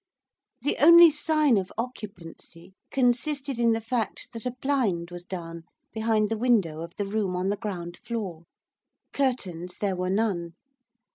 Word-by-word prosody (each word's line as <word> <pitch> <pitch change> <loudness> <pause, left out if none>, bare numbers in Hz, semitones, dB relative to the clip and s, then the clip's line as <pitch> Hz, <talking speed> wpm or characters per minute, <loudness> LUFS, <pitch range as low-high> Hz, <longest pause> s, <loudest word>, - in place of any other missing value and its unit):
The 290 - +1
only 340 +2 +9
sign 300 -4 +2
of 190 -1 -2
occupancy 190 -7 -8 0.2
consisted 270 +1 0
in 230 -1 +4
the 225 - 0
fact 225 +1 -3
that 230 +1 -5
a 250 - -4
blind 210 -12 0
was 175 0 -8
down 170 -2 -7 0.3
behind 220 -1 +1
the 225 -1 -2
window 200 -11 +2
of 170 +1 -8
the 205 - -2
room 200 -2 -1
on 180 +2 -1
the 205 - +1
ground 175 -5 -6
floor. 190 -8 -5 0.7
Curtains 185 -10 -2
there 200 -2 -1
were 180 0 -2
none. 185 -5 -1
210 Hz, 150 wpm, -26 LUFS, 180-245 Hz, 0.7 s, only